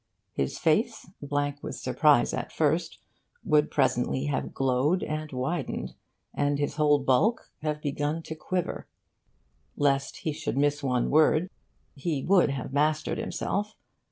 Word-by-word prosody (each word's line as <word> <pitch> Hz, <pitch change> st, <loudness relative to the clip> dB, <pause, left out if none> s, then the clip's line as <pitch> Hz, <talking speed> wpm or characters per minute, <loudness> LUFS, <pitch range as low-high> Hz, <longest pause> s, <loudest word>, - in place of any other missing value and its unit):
His 70 Hz, -, -2 dB
face, 220 Hz, +8 st, +1 dB
blank 145 Hz, 0 st, -2 dB
with -, -, -5 dB
surprise -, -, +3 dB
at -, -, -4 dB
first, -, -, 0 dB, 0.5 s
would 150 Hz, 0 st, +3 dB
presently 130 Hz, 0 st, +1 dB
have 145 Hz, -2 st, -2 dB
glowed 135 Hz, +7 st, +1 dB
and 155 Hz, 0 st, -4 dB
widened, 135 Hz, +3 st, -3 dB, 0.4 s
and 145 Hz, 0 st, +1 dB
his 145 Hz, +2 st, -2 dB
whole 150 Hz, -1 st, +4 dB
bulk 140 Hz, -, +1 dB
have 150 Hz, 0 st, -3 dB
begun 145 Hz, +2 st, -2 dB
to 160 Hz, -, -6 dB
quiver. 175 Hz, +3 st, -3 dB, 0.9 s
Lest 140 Hz, -1 st, +1 dB
he 155 Hz, -, -3 dB
should 145 Hz, -, -4 dB
miss 145 Hz, +1 st, +2 dB
one 125 Hz, -3 st, 0 dB
word, 155 Hz, +3 st, +4 dB, 0.4 s
he 145 Hz, -1 st, -2 dB
would 185 Hz, -4 st, +4 dB
have 135 Hz, -1 st, -4 dB
mastered 155 Hz, +2 st, +1 dB
himself. 210 Hz, +2 st, -2 dB
145 Hz, 135 wpm, -27 LUFS, 140-155 Hz, 0.9 s, whole